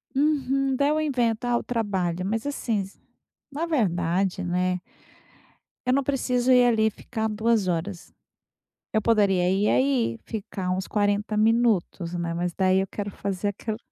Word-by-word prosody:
Uhum, 275 -2 +1
daí 280 +2 +2
eu 305 +1 +1
invento, 245 -6 0
ah, 240 -1 +2
o - - -4
trabalho, 190 -7 -1
mas 220 +5 -2
assim, 215 -8 -3 0.5
na 300 +4 -2
verdade, 190 - 0
né, 180 +1 0 1.1
eu 250 - +2
não 275 0 +2
preciso 255 -2 +1
ir 250 -1 +6
ali 220 -2 +3
ficar 220 +1 -4
2 215 -2 +1
horas. 175 +2 -3 0.8
Eu 220 - +2
poderia 200 -5 +3
ir 195 +3 +2
aí 120 -3 +1
ficar 195 -3 -5
uns 185 +1 -1
40 205 0 0
minutos, 215 -6 +1
né. 170 -1 -2
Mas 175 0 -2
daí 190 +1 +2
eu 195 - -3
quero 205 -1 -5
fazer 195 0 -3
aquilo 215 +2 -4
210 Hz, 150 wpm, -25 LUFS, 185-245 Hz, 1.1 s, ir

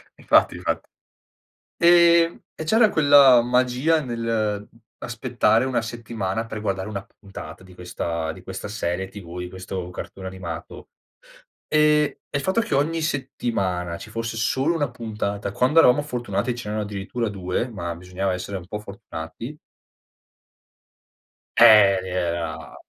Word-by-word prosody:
Infatti, - - +3
infatti. - - -3 0.9
E 170 -1 +5 0.2
e 160 - -4
c'era 220 +7 +4
quella 140 -5 +7
magia 125 +6 +2
nell'aspettare 115 0 -1
una 125 -3 0
settimana 115 -2 -4
per 110 -1 -6
guardare 95 -1 -2
una 100 -2 -6
puntata 95 -5 -10
di 95 -1 -15
questa 85 -2 -4
di 90 +2 -13
questa 95 +1 -7
serie 95 -3 -3
TV, 90 -3 -9
di 90 - -5
questo 95 -1 -6
cartone 95 +1 -8
animato. 90 -3 -7 0.8
E 150 -1 +3
e 145 - -1
il - - -3
fatto 190 +9 +2
che 230 -10 -2
ogni 160 +4 +1
settimana 100 - -2
ci 110 - -10
fosse 115 0 -4
solo 135 +8 +1
1 145 -4 0
puntata, 105 -4 -4
quando 130 +9 +3
eravamo 130 0 +6
fortunati 125 -3 -2
ce 120 -3 -7
n'erano 105 0 -2
addirittura 105 +3 -3
2, 95 +3 -2
ma 85 -7 -5
bisognava 90 +2 -3
essere 90 +2 -4
un 90 - -9
po' 105 +2 -5
fortunati 100 - -8 2.0
eh, 105 -4 +8
era 85 -4 -3
110 Hz, 135 wpm, -23 LUFS, 95-130 Hz, 2.0 s, eh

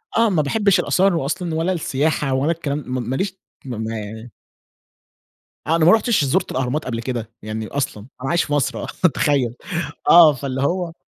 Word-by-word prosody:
آه، 230 0 +4
ما 175 -6 +2
باحبش 200 +6 +2
الأثار 190 0 +2
و 165 - -1
أصلًا 165 +3 -2
ولا 165 +4 0
السياحة 150 -3 0
ولا 135 +5 +1
الكلام 150 -3 -3
م 125 -2 -3
ما 130 - -1
ليش 190 +6 -1 0.3
م 125 -3 -5
ما 110 0 -3
يعني 110 +3 -8 1.4
أنا 160 0 +3
ما 175 - +8
رُحتش 220 -7 +3
زُرت 130 - 0
الأهرامات 130 +4 -2
قبل 115 -2 -3
كده، 120 -2 -4
يعني 110 +1 -5
أصلًا. 125 -6 -4
أنا 135 - -3
عايش 170 0 +2
في 145 - -4
مصر 145 -3 0
آه، - - -5 0.3
تخيل. 130 -5 +1 0.5
آه، 165 -3 +8
فاللي 135 0 -4
هو 170 +3 -1
145 Hz, 185 wpm, -21 LUFS, 125-170 Hz, 1.4 s, ما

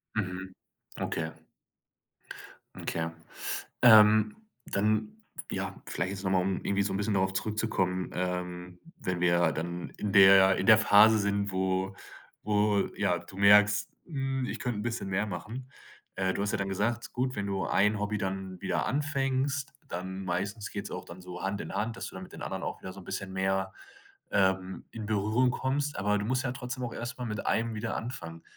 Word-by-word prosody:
Mhm. 95 -2 -3 0.5
Okay. 80 -1 -2 1.4
Okay. 80 0 -2 0.7
Ähm, 110 -2 +7 0.3
dann, 105 +1 0 0.3
ja, - - -3
vielleicht 95 - -2
jetzt 95 0 -6
nochmal, 95 -1 +2
um 95 0 -2
irgendwie 100 0 +1
so 100 - -1
'n - - -1
bisschen 105 +1 0
darauf 95 0 +2
zurückzukommen, 95 -3 -1
ähm, 90 0 -4 0.2
wenn 90 -1 -3
wir 85 -2 +3
dann 85 +3 -4
in 100 -2 -2
der 95 -1 +8
in - - -1
der 110 -1 +8
Phase 110 0 +7
sind, 100 -1 0
wo 95 +1 0 0.5
wo 105 -1 +2
ja, 90 -4 +1
du 90 +2 -13
merkst: 105 +1 +5 0.2
„Hm, 135 -4 -2
ich - - -4
könnte 120 -4 -2
'n - - -4
bisschen 115 -3 -3
mehr 95 +3 0
machen.“ 110 +8 -6 0.5
Äh, 95 -1 +1
du - - -3
hast 105 - -1
ja - - +1
dann 100 0 -2
gesagt, 110 +4 -1
gut, 130 0 -1
wenn 100 -1 -2
du 95 -1 -1
ein 105 +1 +3
Hobby 105 +1 -1
dann 95 -2 -4
wieder - - 0
anfängst, 140 0 0
dann 95 +2 -5
meistens 100 +4 -3
geht's 100 0 -5
auch - - -5
dann 85 +2 -11
so 90 0 -8
Hand 100 +1 -2
in - - -6
Hand, 115 +2 -1
dass - - -5
du - - -9
dann - - -7
mit - - -15
den - - -10
anderen - - -4
auch - - -4
wieder 95 - -7
so 95 - -11
'n 90 - -13
bisschen 95 +1 -5
mehr, 95 0 0 0.6
ähm, 95 -1 +1
in 110 -2 -6
Berührung 110 +4 +2
kommst. 140 +2 -1
Aber 105 +1 +2
du 105 - -2
musst 130 +3 0
ja 120 - -1
trotzdem 125 0 -5
auch 120 - -4
erstmal 125 +1 -5
mit 105 -1 -4
einem 115 0 +1
wieder 110 +1 -3
anfangen. 85 -9 -6
100 Hz, 185 wpm, -29 LUFS, 95-110 Hz, 1.4 s, der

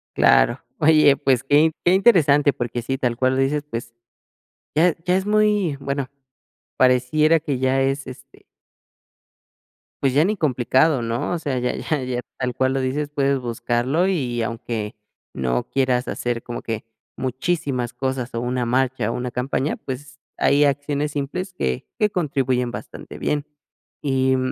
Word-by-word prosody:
Claro, - - +4 0.2
oye, 155 -2 +6
pues, 130 -3 +1
que 150 +3 +4
que 175 - +4
interesante, 155 -9 +5
porque 120 0 -3
sí, 135 +3 -2
tal 125 -3 0
cual 130 +2 +1
lo 135 - +2
dices, 145 +2 0
pues, 115 -1 -6 0.8
ya 165 +2 +4
ya 180 - +3
es 190 +1 0
muy 210 -7 +2
bueno, 140 -1 -3 0.7
pareciera 130 +6 +4
que 145 -4 -3
ya 130 +1 +2
es, 135 0 -1
este 130 +1 -12 1.6
pues 135 -2 +2
ya 145 +4 +4
ni 205 +3 0
complicado, 130 0 +2
¿no?, 115 +8 -2
o 175 - -2
sea, 140 -5 -2
ya 125 0 -1
ya 150 -3 -2
ya 125 -1 -2 0.2
tal 125 -1 -2
cual 130 0 +1
lo 135 - 0
dices, 140 +3 -2
puedes 140 -2 +1
buscarlo 120 +7 0
y, 125 -10 -1
aunque 115 -1 -4 0.4
no 60 -2 -1
quieras 130 -2 +1
hacer 120 -1 -2
como 120 0 -6
que 115 0 -5 0.3
muchísimas 130 -2 -2
cosas, 130 -2 -3
o 115 - -2
una 125 +1 -1
marcha, 125 -2 0
o - - -3
una 125 +1 -3
campaña, 130 +4 -1
pues, 130 0 -8 0.2
hay 145 +1 +4
acciones 145 +1 0
simples 150 +7 -4
que 65 - -2
que 210 -1 +3
contribuyen 130 -8 0
bastante - - -9
bien, 150 -1 -1 0.6
y 130 -2 +2
135 Hz, 155 wpm, -22 LUFS, 125-150 Hz, 1.6 s, oye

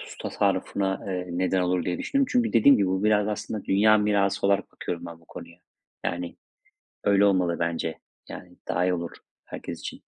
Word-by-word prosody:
su - - -11
tasarrufuna, 95 0 -1
eee, 90 -1 -3
neden 90 +1 0
olur 90 -1 0
diye 90 - -2
düşündüm. 275 -1 +1
Çünkü 240 -2 +1
dediğim 135 +5 +6
gibi, 100 - +2
bu 95 +2 -1
biraz 105 -1 +3
da - - -1
aslında 105 0 -5
dünya 110 +2 +4
mirası 100 -2 +1
olarak 100 0 +1
bakıyorum 85 0 -5
ben 85 0 -10
bu - - -23
konuya. 85 +2 -11 0.5
Yani, 85 0 -3 0.7
öyle 100 0 +4
olmalı 90 -4 +2
bence. 85 -1 -2 0.3
Yani, - - -10
daha 90 +2 +1
iyi 90 0 +2
olur 85 -1 -4 0.4
herkes - - -7
için. - - -8
95 Hz, 185 wpm, -26 LUFS, 90-100 Hz, 0.7 s, dediğim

